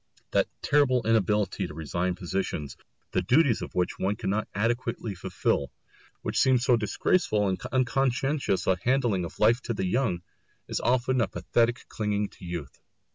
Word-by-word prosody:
That - - +3 0.2
terrible 130 -5 +3
inability 105 -2 +1
to 75 - -10
resign 85 +3 -2
positions, 90 -5 -3 0.4
the - - +1
duties 130 -3 +3
of - - -7
which 90 -1 0
one 100 +2 0
cannot 105 -1 -1
adequately 115 0 -1
fulfil, 90 - -1 0.5
which - - -1
seems 130 -2 +4
so 125 - +5
disgraceful 110 - +1
and 95 -1 -2
unconscientious 135 -2 +1
a 95 -1 +2
handling 120 -8 +1
of 85 - -9
life 115 +4 +4
to 120 - -3
the 95 - -1
young, 90 -4 0 0.4
is - - -2
often 125 +1 +2
a - - +2
pathetic 120 +1 0
clinging 105 -1 -1
to - - -14
youth. 85 -6 -6
110 Hz, 155 wpm, -27 LUFS, 95-125 Hz, 0.5 s, so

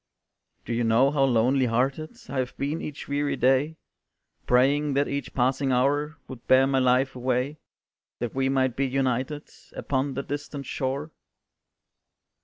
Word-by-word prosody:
"Do 120 - -3
you 120 +1 0
know 115 +5 +4
how 140 -2 +3
lonely 125 +1 +2
hearted 135 +7 -1
I 135 - -3
have 125 0 -3
been 145 +4 -2
each 150 - -7
weary 145 0 -1
day, 135 +5 +2 0.7
Praying 140 +3 +3
that 140 +1 +2
each 140 0 -4
passing 130 +2 +1
hour 145 +5 +1
Would 130 -3 -11
bear 130 +1 +6
my 135 0 +1
life 130 +1 +2
away, 130 +4 -1 0.6
That 120 -2 -4
we 135 0 0
might 130 -2 +1
be 135 +1 0
united 130 +2 -1 0.2
Upon 135 0 -2
that 140 - -4
distant 145 -1 -5
shore?" 135 +5 -3
135 Hz, 150 wpm, -26 LUFS, 130-140 Hz, 0.7 s, bear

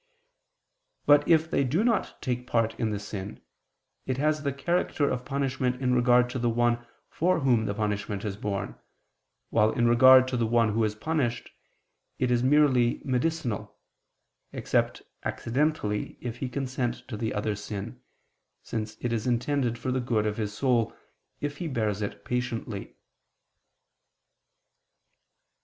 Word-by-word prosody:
But 145 0 +5
if 160 -1 +3
they - - +2
do 150 - +1
not 235 -2 0
take 125 0 -2
part 115 -2 +1
in 115 -2 +1
the 105 - -2
sin, 100 -1 -6 0.7
it 130 -1 -1
has 150 +2 +1
the 140 -2 -1
character 145 +1 0
of 125 - -2
punishment 130 -2 -1
in 125 -1 +1
regard 125 0 +4
to 130 - -3
the 120 0 +1
one 120 0 +1 0.2
for 180 0 +1
whom 120 -5 +2
the 100 - -2
punishment 105 -1 -2
is 100 -2 -2
borne, 100 -1 -3 0.8
while, 110 -1 +4
in 120 -3 +2
regard 130 +2 +7
to 130 - -1
the 115 -1 +1
one 115 -2 +2
who 115 +1 +1
is 105 -1 0
punished, 125 -2 -2 0.7
it 125 -1 0
is 120 -1 +3
merely 130 -3 +3
medicinal 125 -7 -2 0.7
(except - - -1 0.2
accidentally, 125 -5 -1
if 120 -1 -5
he 130 +1 -3
consent 130 -2 -3
to 120 - -5
the 110 +1 -2
other's 105 0 -2
sin), 110 +4 -6 0.6
since 110 -1 -4
it 120 -1 -1
is 115 +1 -2
intended 125 0 0
for 130 - -3
the 130 0 0
good 115 -3 0
of 105 0 -1
his 105 -2 -2
soul, 120 0 +1 0.5
if 145 0 -3
he 170 - -3
bears 110 -7 -1
it 100 0 -5
patiently. 120 -4 -3
120 Hz, 150 wpm, -27 LUFS, 110-135 Hz, 0.8 s, regard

